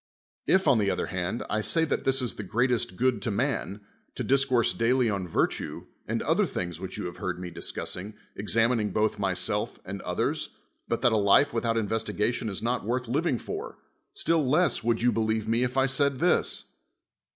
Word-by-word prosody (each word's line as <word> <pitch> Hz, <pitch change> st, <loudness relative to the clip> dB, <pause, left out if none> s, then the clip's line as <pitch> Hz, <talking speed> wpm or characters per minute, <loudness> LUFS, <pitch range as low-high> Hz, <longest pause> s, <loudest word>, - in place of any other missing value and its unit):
If, 190 Hz, -2 st, +3 dB
on 130 Hz, -5 st, +5 dB
the 100 Hz, -2 st, +2 dB
other -, -, -1 dB
hand, 95 Hz, +5 st, -2 dB
I 110 Hz, -, 0 dB
say 165 Hz, +9 st, +4 dB
that -, -, -2 dB
this 135 Hz, -1 st, +2 dB
is 120 Hz, -, 0 dB
the 105 Hz, -, -6 dB
s'l'^'^it' 120 Hz, +7 st, +1 dB
'^t 120 Hz, -5 st, -1 dB
g'ood 125 Hz, -1 st, +1 dB
to 115 Hz, -, -1 dB
num, 110 Hz, -2 st, -1 dB, 0.3 s
to -, -, -3 dB
dis 135 Hz, 0 st, +3 dB
course 125 Hz, -4 st, +2 dB
daily 120 Hz, 0 st, +2 dB
on 95 Hz, -3 st, -2 dB
vii 80 Hz, -, +3 dB
tue, -, -, -7 dB, 0.2 s
and -, -, -1 dB
other -, -, +2 dB
thinjics 85 Hz, -2 st, -4 dB
which 95 Hz, -, -6 dB
you -, -, -4 dB
have 90 Hz, -, -6 dB
lu^ard 90 Hz, -1 st, -3 dB
me 90 Hz, -1 st, -6 dB
discussin.tr. 95 Hz, +4 st, -6 dB, 0.2 s
examining 110 Hz, +1 st, +1 dB
both 105 Hz, +1 st, 0 dB
myself 100 Hz, +2 st, -1 dB
and 95 Hz, 0 st, -6 dB
others, 90 Hz, 0 st, -2 dB, 0.3 s
but 115 Hz, +1 st, -2 dB
that 120 Hz, -, +5 dB
a -, -, +3 dB
life 105 Hz, +7 st, +4 dB
without 115 Hz, 0 st, 0 dB
inves 110 Hz, 0 st, 0 dB
tigation 110 Hz, +2 st, -1 dB
is 100 Hz, +1 st, -5 dB
not 120 Hz, -1 st, 0 dB
worth 125 Hz, +3 st, -2 dB
living 140 Hz, +2 st, +1 dB
for, -, -, -6 dB, 0.4 s
still 165 Hz, -1 st, +2 dB
less 150 Hz, +4 st, +2 dB
would 115 Hz, 0 st, +1 dB
you 120 Hz, -, +4 dB
believe 110 Hz, -1 st, 0 dB
me 115 Hz, +2 st, +1 dB
if 125 Hz, +1 st, -1 dB
I 135 Hz, -, +4 dB
said 140 Hz, 0 st, +1 dB
this. 175 Hz, +6 st, +1 dB
115 Hz, 205 wpm, -27 LUFS, 105-130 Hz, 0.4 s, on